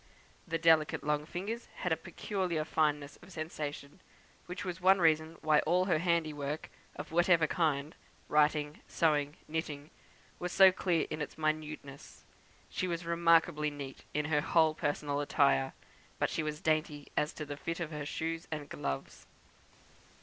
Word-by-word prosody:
The 165 Hz, -, 0 dB
delicate 160 Hz, -2 st, +4 dB
long 150 Hz, 0 st, 0 dB
fingers 205 Hz, +8 st, -4 dB
had -, -, -2 dB
a -, -, +4 dB
peculiar 180 Hz, -7 st, -3 dB
fineness 150 Hz, -3 st, 0 dB
of -, -, -16 dB
sensation, 155 Hz, -2 st, -5 dB, 0.5 s
which 180 Hz, +3 st, -5 dB
was 180 Hz, 0 st, -4 dB
one 190 Hz, +2 st, +6 dB
reason 160 Hz, -1 st, +2 dB
why 155 Hz, -1 st, +4 dB
all 180 Hz, +3 st, +2 dB
her 175 Hz, -5 st, +2 dB
handiwork, 155 Hz, -4 st, -1 dB, 0.2 s
of -, -, -7 dB
whatever 170 Hz, 0 st, +4 dB
kind 155 Hz, -2 st, 0 dB, 0.3 s
writing, 150 Hz, 0 st, +2 dB
sewing, 150 Hz, -2 st, +1 dB
knitting 155 Hz, -1 st, -4 dB, 0.5 s
was 180 Hz, 0 st, -3 dB
so 190 Hz, 0 st, +8 dB
clear 180 Hz, -3 st, +1 dB
in 155 Hz, -, -3 dB
its 150 Hz, -, -5 dB
minuteness. 155 Hz, -3 st, -4 dB, 0.4 s
She 185 Hz, -, -2 dB
was 170 Hz, -1 st, -3 dB
remarkably 165 Hz, -2 st, +3 dB
neat 140 Hz, -2 st, -8 dB
in 150 Hz, 0 st, -1 dB
her 150 Hz, -1 st, +2 dB
whole 160 Hz, 0 st, +3 dB
personal 145 Hz, -1 st, -1 dB
attire; 65 Hz, -, +3 dB, 0.5 s
but -, -, 0 dB
she -, -, -1 dB
was 155 Hz, +1 st, -4 dB
dainty 155 Hz, -3 st, 0 dB
as 150 Hz, -, +1 dB
to 150 Hz, -, -6 dB
the 145 Hz, 0 st, -5 dB
fit 165 Hz, +4 st, -4 dB
of 165 Hz, -2 st, -3 dB
her 150 Hz, -1 st, -4 dB
shoes 165 Hz, +2 st, -3 dB
and 150 Hz, -2 st, -5 dB
gloves. 70 Hz, -1 st, -5 dB
155 Hz, 155 wpm, -32 LUFS, 150-170 Hz, 0.5 s, so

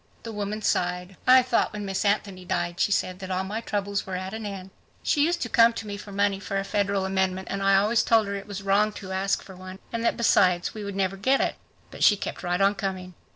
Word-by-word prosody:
The 230 Hz, -, -6 dB
woman 210 Hz, 0 st, -4 dB
sighed. 180 Hz, +1 st, -1 dB
"I 255 Hz, 0 st, +8 dB
thought 245 Hz, -3 st, +1 dB
when 210 Hz, -1 st, -5 dB
Miss 195 Hz, -1 st, -2 dB
Anthony 200 Hz, -2 st, 0 dB
died," 175 Hz, 0 st, -2 dB
she -, -, +2 dB
said, 185 Hz, -2 st, 0 dB
"that 190 Hz, -1 st, -7 dB
all 185 Hz, 0 st, -1 dB
my 210 Hz, +4 st, -4 dB
troubles 200 Hz, -2 st, -2 dB
were 190 Hz, -, -5 dB
at 185 Hz, +2 st, -5 dB
an 220 Hz, -1 st, -5 dB
end. 195 Hz, -1 st, -7 dB, 0.3 s
She 290 Hz, -, +2 dB
used 340 Hz, +2 st, +1 dB
to -, -, -3 dB
come 230 Hz, 0 st, +5 dB
to 225 Hz, -, -6 dB
me 205 Hz, -1 st, -5 dB
for 205 Hz, 0 st, -10 dB
money 200 Hz, 0 st, +1 dB
for 195 Hz, 0 st, -3 dB
a 195 Hz, -, 0 dB
federal 200 Hz, -1 st, 0 dB
amendment 190 Hz, 0 st, -1 dB
and 195 Hz, -, -2 dB
I 195 Hz, 0 st, +4 dB
always 210 Hz, +4 st, +3 dB
told 225 Hz, -2 st, +3 dB
her 200 Hz, -, -4 dB
it 200 Hz, 0 st, -6 dB
was 200 Hz, -1 st, -6 dB
wrong 200 Hz, +2 st, +3 dB
to 190 Hz, -2 st, -8 dB
ask 190 Hz, +1 st, 0 dB
for 190 Hz, -, -12 dB
one, 185 Hz, +1 st, -9 dB, 0.2 s
and 230 Hz, 0 st, -2 dB
that -, -, +1 dB
besides 185 Hz, -6 st, +3 dB
we 215 Hz, -, -6 dB
would 200 Hz, -1 st, -5 dB
never 195 Hz, 0 st, -1 dB
get 260 Hz, +7 st, +2 dB
it. -, -, +1 dB, 0.4 s
But -, -, -4 dB
she 205 Hz, -, +6 dB
kept -, -, -5 dB
right 180 Hz, +1 st, -1 dB
on 200 Hz, +1 st, +4 dB
coming. 190 Hz, -2 st, -4 dB
195 Hz, 255 wpm, -26 LUFS, 190-210 Hz, 0.4 s, I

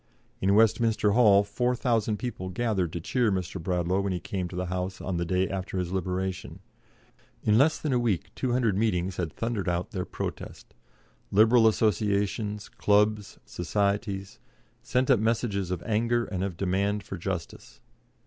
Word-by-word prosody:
In 100 Hz, +1 st, +3 dB
Westminster 110 Hz, -1 st, +3 dB
Hall 105 Hz, -3 st, +6 dB
4,000 115 Hz, 0 st, 0 dB
people 105 Hz, -7 st, -5 dB
gathered 95 Hz, -4 st, -1 dB
to 85 Hz, -, -3 dB
cheer 115 Hz, +6 st, +1 dB
Mr. 95 Hz, -1 st, -3 dB
Bradlaugh 90 Hz, +1 st, 0 dB
when 100 Hz, 0 st, -1 dB
he 90 Hz, -, -2 dB
came 90 Hz, +2 st, -4 dB
to 90 Hz, -, -9 dB
the 90 Hz, 0 st, -2 dB
House 90 Hz, +1 st, -3 dB
on 90 Hz, -2 st, -3 dB
the 85 Hz, -, -1 dB
day 90 Hz, +2 st, +1 dB
after 95 Hz, 0 st, -4 dB
his 90 Hz, -1 st, -2 dB
liberation. 95 Hz, 0 st, -3 dB, 0.9 s
In 105 Hz, -, +3 dB
less 145 Hz, +7 st, +4 dB
than 150 Hz, -4 st, -2 dB
a 125 Hz, -, +3 dB
week 110 Hz, -8 st, -1 dB
200 120 Hz, -5 st, 0 dB
meetings 95 Hz, -4 st, 0 dB
had 85 Hz, -4 st, -2 dB
thundered 115 Hz, -5 st, -2 dB
out 85 Hz, +4 st, -2 dB
their 95 Hz, -4 st, -3 dB
protest. -, -, -7 dB, 0.6 s
Liberal 110 Hz, +3 st, +6 dB
associations, 105 Hz, 0 st, 0 dB
clubs, 105 Hz, 0 st, +1 dB
societies, 100 Hz, -, -2 dB, 0.4 s
sent 130 Hz, +2 st, +1 dB
up 125 Hz, -, +5 dB
messages 110 Hz, -4 st, 0 dB
of 90 Hz, -2 st, -3 dB
anger 115 Hz, +2 st, +1 dB
and 95 Hz, -3 st, -3 dB
of 95 Hz, -3 st, -4 dB
demand 100 Hz, +2 st, 0 dB
for 95 Hz, -, -6 dB
justice. 95 Hz, -1 st, -6 dB
100 Hz, 160 wpm, -27 LUFS, 90-110 Hz, 0.9 s, Hall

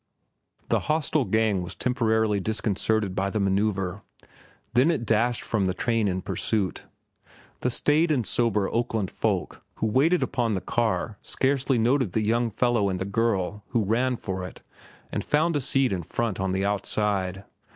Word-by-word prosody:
The -, -, +3 dB
hostile 155 Hz, -2 st, +1 dB
gang 110 Hz, -4 st, +1 dB
was 90 Hz, +1 st, -5 dB
temporarily 110 Hz, -4 st, +1 dB
disconcerted 110 Hz, 0 st, 0 dB
by 95 Hz, +1 st, -1 dB
the 110 Hz, -, -2 dB
manoeuvre, 100 Hz, -1 st, 0 dB, 0.7 s
then 130 Hz, +6 st, +4 dB
it 150 Hz, -9 st, 0 dB
dashed 115 Hz, +2 st, +1 dB
from 100 Hz, -4 st, 0 dB
the 95 Hz, -, -1 dB
train 115 Hz, 0 st, +1 dB
in 95 Hz, -1 st, -2 dB
pursuit. 100 Hz, -7 st, -2 dB, 0.7 s
The 125 Hz, -, 0 dB
staid 150 Hz, +6 st, +2 dB
and 130 Hz, -7 st, +1 dB
sober 105 Hz, -4 st, +1 dB
Oakland 115 Hz, -4 st, -1 dB
folk -, -, -2 dB
who 110 Hz, -1 st, -1 dB
sat 170 Hz, +4 st, +3 dB
upon 120 Hz, -5 st, 0 dB
the -, -, -1 dB
car 110 Hz, -1 st, -1 dB
scarcely 135 Hz, -1 st, +1 dB
noted 120 Hz, -3 st, +2 dB
the 110 Hz, -, +1 dB
young 115 Hz, +2 st, +1 dB
fellow 115 Hz, -2 st, +1 dB
and 95 Hz, -, -2 dB
the 95 Hz, -, -3 dB
girl 105 Hz, -1 st, -1 dB
who 115 Hz, -3 st, 0 dB
ran 125 Hz, +4 st, +1 dB
for 95 Hz, -3 st, -4 dB
it 90 Hz, -, -9 dB, 0.5 s
and -, -, -2 dB
found 160 Hz, +2 st, +1 dB
a 145 Hz, -, +1 dB
seat 135 Hz, -2 st, +2 dB
in 90 Hz, -, -2 dB
front 110 Hz, +4 st, -2 dB
on 95 Hz, 0 st, 0 dB
the 95 Hz, +1 st, 0 dB
outside. 100 Hz, -1 st, -1 dB
110 Hz, 165 wpm, -26 LUFS, 95-120 Hz, 0.7 s, then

